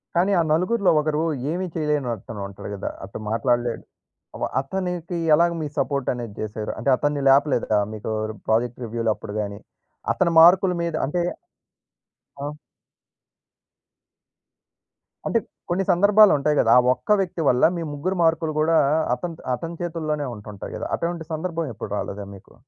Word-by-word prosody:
కానీ, 180 +4 +3
ఆ - - +5
నలుగురులో 185 +5 +2
ఒకరు 155 0 0 0.3
ఏమీ 180 +3 -2
చెయ్యలేని 150 -4 0
అతనుంటాడు 100 -2 -8
గదా! 100 - -4
అటు 95 - -7
మాట్లాడలేడు. 120 +1 0 0.6
వ - - +2 0.2
అతనికి 180 +2 -4 0.2
ఎలాగ 170 +3 +4
మీ 155 - -2
సపోర్టనేది 125 -5 -1
జేసారు? 110 0 -4
అంటే, - - 0
అతన్ని 145 +1 0
లేపలేదా 135 -5 +3
మీరూ 110 0 -5 0.4
వ్ 120 +2 +2 0.2
రివ్యూలప్పుడు 110 -2 -2
గానీ? 100 -1 -5 0.5
అతని 175 -2 +1
మార్కుల 180 +3 +7
మీద 170 -1 -2
అంటే 175 +6 -1 1.2
ఆ! 145 +1 -4 2.7
అంటే 230 - +2 0.3
కొన్ని 180 +3 +1
సందర్భాలుంటాయి 185 -6 +5
గదా! 115 - +5
ఆ - - +5
ఒక్క 130 +12 +1
వ్యక్తి 175 -3 -3
వల్ల 125 - +2
మీ 170 - -3
ముగ్గురు 185 +6 -2
మార్కులు 160 -1 +1
గూడా 160 +1 +3 0.4
అతనిత్ 170 +3 -7
అతని 165 +6 -7
చేతుల్లోనే 155 -4 -2
ఉంటుంటాయి 105 -1 -9
గదా! - - -4
అటువంటి 170 -1 -3
సందర్భం 165 0 -3
ఎప్పుడు 110 - -7
రాలేదా 100 0 -5
మీకు? 95 - -17
150 Hz, 130 wpm, -23 LUFS, 120-175 Hz, 2.7 s, మార్కుల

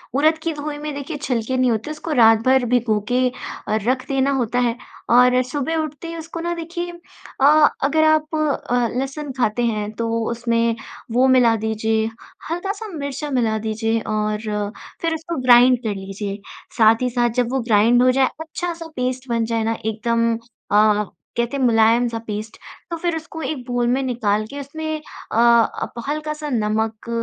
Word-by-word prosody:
उरद 310 +3 +3
की 330 -1 -1
धोई 295 0 -5
में 300 0 -5
देखिए 290 +2 -5
छिलके 255 -2 -2
नहीं 255 -2 +3
होते, 225 +7 -2
उसको 310 +1 -6
रात 225 -3 +6
भर 260 -1 +4
भिगोके 245 +1 +1 0.4
अ, 215 - +1
रख 255 0 +1
देना 275 0 +1
होता 245 -2 0
है 240 -1 +1 0.3
और 250 +1 +5
सुबह 290 +4 -2
उठते 310 +1 -4
ही 335 - -6
उसको 330 +1 -7
ना 345 +1 -2
देखिए 345 +1 -5 0.5
अ, - - +6 0.4
अगर 315 +3 +3
आप 310 0 +2
अ, 260 -5 0
लहसुन 270 +2 -3
खाते 240 0 +1
हैं 215 -2 -1
तो 230 +1 -3 0.2
उसमें 230 -1 0 0.4
वो 255 +3 +4
मिला 245 -3 +5
दीजिए, 220 0 0 0.5
हल्का-सा 395 +5 -3
मिर्चा 290 -4 -5
मिला 225 -4 +1
दीजिए 225 +1 -1
और 215 0 -1 0.6
फ़िर 330 -1 0
उसको 325 +1 -4
ग्राइंड 250 0 +6
कर 210 -2 -2
लीजिए। 195 +1 -5 0.4
साथ 225 +1 +5
ही 250 - +1
साथ 240 0 +1
जब 240 - -2
वो 265 - 0
ग्राइंड 230 +2 +4
हो 255 - +5
जाए, 265 0 +3
अच्छा-सा 330 +1 -5
पेस्ट 255 +1 -2
बन 230 -1 +1
जाए 225 -1 -1
ना 225 0 -1
एकदम 230 +1 +1 0.4
अ, 210 0 +4 0.3
कहते 235 +4 0
हैं 265 - -1
मुलायम-सा 230 0 +3
पेस्ट 215 +1 -5 0.3
तो 335 - -2
फ़िर 340 0 -1
उसको 320 0 -7
एक 310 - -2
बाउल 245 -1 0
में 260 +2 +2
निकाल 215 -4 0
के 285 +3 -8
उसमें 315 +3 -4 0.3
अ, - - -1
आप 235 -1 +3 0.2
हल्का-सा 305 0 -3
नमक 220 -1 -1
250 Hz, 170 wpm, -21 LUFS, 225-295 Hz, 0.6 s, रात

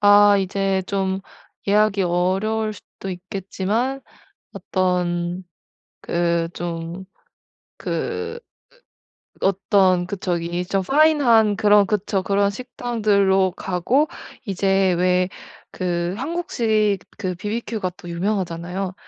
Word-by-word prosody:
아 205 0 +7
이제 195 0 0
좀 190 -1 -1 0.5
예약이 210 -1 +3
어려울 195 +5 0
수도 195 -1 -9
있겠지만 195 +7 -2 0.5
어떤 180 -1 -1 0.6
그 170 -1 0
좀 170 +1 -5 0.7
그 455 +1 -3 1.0
으 - - +2
어떤 190 -2 +3
그 200 - -3
저기 175 -1 -2
좀 195 +1 0
파인한 270 -5 +4
그런 205 -1 +5
그쵸. 205 -2 0
그런 200 0 +2
식당들로 205 -5 +1
가고 195 - 0 0.4
이제 195 -1 +2
왜 180 +1 +2 0.4
그 175 -1 -2
한국식 230 - 0 0.2
그 185 -4 -2
바비큐 220 +3 -3
가 185 - 0
또 175 - -10
유명하잖아요. 180 0 -2
195 Hz, 195 characters per minute, -22 LUFS, 180-210 Hz, 1.0 s, 아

